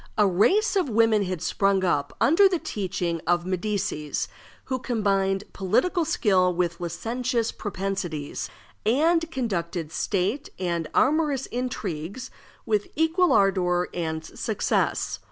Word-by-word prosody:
A 210 - +5
race 360 - +3
of 370 -8 +1
women 220 -2 +3
had 180 -3 -4
sprung 195 -1 +2
up, 145 -6 0
under 360 +8 +5
the 365 - +1
teaching 180 - -3
of 175 0 +2
the 185 - -5
Medicis, 180 -6 -2 0.4
who 260 -1 -3
combined 195 -5 0
political 320 - +1
skill 195 - +3
with 175 -1 -1
licentious 230 +7 -2
propensities, 185 - -4 0.3
and 325 +8 +2
conducted 175 - -3
state 205 - -1
and 170 -3 -2
amorous 290 -1 +2
intrigues 215 -5 -4 0.3
with 210 -2 0
equal 325 +3 +3
ardor 180 -3 +2
and 160 -2 -3
success. - - -1
200 Hz, 120 wpm, -25 LUFS, 175-255 Hz, 0.4 s, A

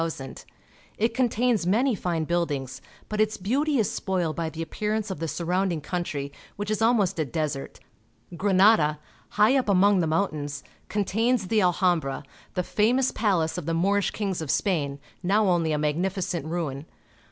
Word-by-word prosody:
It 225 +2 +1
contains 240 -5 +1
many 240 +7 +3
fine 175 -5 -1
buildings, 150 -6 -2 0.3
but 215 0 -1
its 215 0 +1
beauty 275 +10 0
is 220 -5 +1
spoiled 180 -5 -1
by 165 -1 -2
the 160 +1 -5
appearance 210 +5 -2
of 185 - -5
the 165 - -2
surround 180 +4 0
ing 160 -3 -3
country, 145 -4 -3 0.2
which 205 +1 -4
is 215 - -1
almost 210 -6 +2
a - - +3
desert. 150 -1 -4 0.6
Granada, 185 -4 +4 0.4
high 215 +5 +5
up 260 -5 +1
among 200 0 +4
the 165 - +1
mountains, 150 -4 -1 0.3
contains 210 +1 0
the 220 -2 +3
Alhambra, 175 -6 +1 0.3
the 180 - 0
famous 245 +8 +2
palace 180 -6 0
of 165 - -8
the 165 - 0
Moorish 200 +4 +2
kings 195 -5 -3
of 155 - -5
Spain, 145 -8 0 0.2
now 200 +4 +2
only 170 -3 +2
a 150 - +1
magnificent 170 +2 -1
ruin. 155 -3 -3
185 Hz, 160 wpm, -26 LUFS, 160-210 Hz, 0.6 s, high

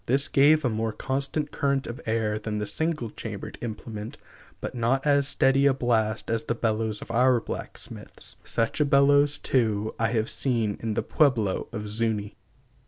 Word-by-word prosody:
This 135 +3 +3
gave 150 +2 +4
a - - +3
more 110 +1 -1
constant 140 +5 -2
current 140 -1 0
of 120 +1 -7
air 110 -1 0
than 105 0 -4
the 105 - -2
single 150 +1 -2
chambered 110 -3 -7
implement, 110 -1 -6 0.4
but - - -5
not 125 +3 0
as 140 -1 +3
steady 135 0 +3
a 135 - +3
blast 110 -4 0
as 115 0 0
the 115 - -1
bellows 110 -2 -1
of - - -9
our 125 +1 +4
blacksmiths. - - -7
Such 115 +5 -1
a - - +4
bellows, 140 +1 +4
too, 110 -4 0
I 115 - +2
have 110 -1 +1
seen 115 -7 0
in 110 -2 -3
the - - 0
Pueblo 120 -10 +1
of 105 -3 -5
Zu├▒i. 105 -1 -2
115 Hz, 170 wpm, -26 LUFS, 110-135 Hz, 0.4 s, gave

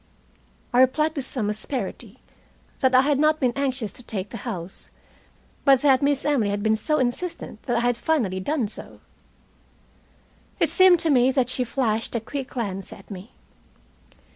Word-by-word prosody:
I 245 - +5
replied, 305 +4 +2
with 275 -3 -2
some 245 -5 -2
asperity, 245 +5 -4 0.6
that 260 -1 +3
I 255 - +8
had 280 0 +1
not 305 +1 +3
been 250 -3 +1
anxious 265 -6 -2
to - - -9
take 205 -5 -5
the 230 - -6
house, 180 -3 -5 0.7
but 270 -1 +5
that 270 -3 +5
Miss 280 -1 +1
Emily 270 -8 +2
had 205 0 -2
been 220 0 +3
so 305 +8 0
insistent 255 -2 -3
that 240 -1 +1
I - - +1
had 245 0 +2
finally 235 -12 0
done 255 +4 -1
so. 205 - -11 1.6
It - - +2
seemed 370 -2 +6
to 325 - +1
me 255 -1 +4
that 255 -2 +1
she 255 - 0
flashed 230 -3 -1
a - - +1
quick 265 +4 -5
glance 195 -7 -5
at - - -13
me. 195 +3 -9
255 Hz, 170 wpm, -24 LUFS, 220-280 Hz, 1.6 s, I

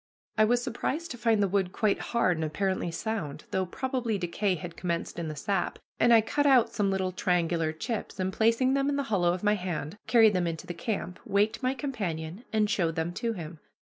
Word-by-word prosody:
I 215 - +5
was 245 +2 +2
surprised 295 +7 -3
to 245 - -6
find 225 -3 +3
the - - +3
wood 190 -1 0
quite 210 0 +1
hard 210 -7 +1
and 160 - -2
apparently 185 +3 -1
sound, 170 -4 -4
though 190 -1 0
probably 250 0 -2
decay 185 +2 0
had 175 +1 -7
commenced 170 -1 -3
in 165 - -3
the 155 - -4
sap, 190 +5 -1 0.2
and 240 - +5
I 230 -1 +8
cut 290 +7 +1
out 260 -4 +5
some 205 -2 +1
little 190 -1 0
triangular 170 -3 +1
chips, 215 +5 -4
and, 190 0 -1
placing 230 +5 +3
them 275 +1 +2
in 285 - 0
the 280 - 0
hollow 175 -3 +3
of 180 +2 -3
my 210 0 +4
hand, 180 -3 -3
carried 225 -3 +6
them 180 -2 +1
into 165 +1 -4
the 175 - -5
camp, 180 -1 -4
waked 210 +3 +1
my 255 +1 0
companion, 195 - -4
and 215 -1 +2
showed 170 -6 0
them 165 +2 -2
to 230 +5 -2
him. 165 -4 -7
195 Hz, 215 wpm, -28 LUFS, 175-230 Hz, 0.2 s, I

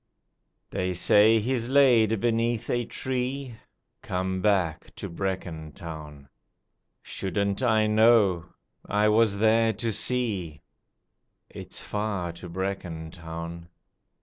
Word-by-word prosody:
They 90 -1 -2
say 105 +5 +5
he's 120 +2 -1
laid 120 -6 +4
beneath 115 0 0
a 120 -1 0
tree, 130 +1 -3 0.5
(Come 95 +1 -2
back 95 -6 0
to - - -6
Brecon 85 -4 -4
Town!) 75 -5 -9 0.8
Shouldn't 100 +2 -2
I 110 -4 +3
know? 105 -5 +4 0.4
I 105 +1 +2
was 110 -1 +3
there 110 +1 +3
to 115 +2 -2
see: 100 -12 -1 0.9
(It's - - -6
far 105 -5 -2
to 85 +1 -10
Brecon 90 -3 -4
Town!) 85 0 -8
100 Hz, 105 wpm, -26 LUFS, 85-115 Hz, 0.9 s, say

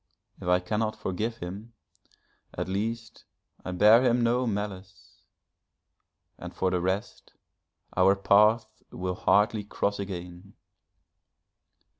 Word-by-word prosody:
If - - -7
I 90 0 +4
cannot 110 +4 -2
forgive 110 +5 -3
him, 100 +6 -8 0.8
at - - -3
least 115 +4 -4 0.4
I - - -6
bear 105 +6 +6
him 120 -1 +2
no 120 +2 +1
malice, 100 -3 -6 1.2
and - - -9
for 95 - 0
the 90 -1 0
rest, 95 +3 -3 0.6
our 95 +2 +4
paths 105 +3 +4 0.2
will 90 0 -4
hardly 105 +3 +2
cross 100 0 -2
again. 90 -1 -7
100 Hz, 110 wpm, -27 LUFS, 95-110 Hz, 1.2 s, bear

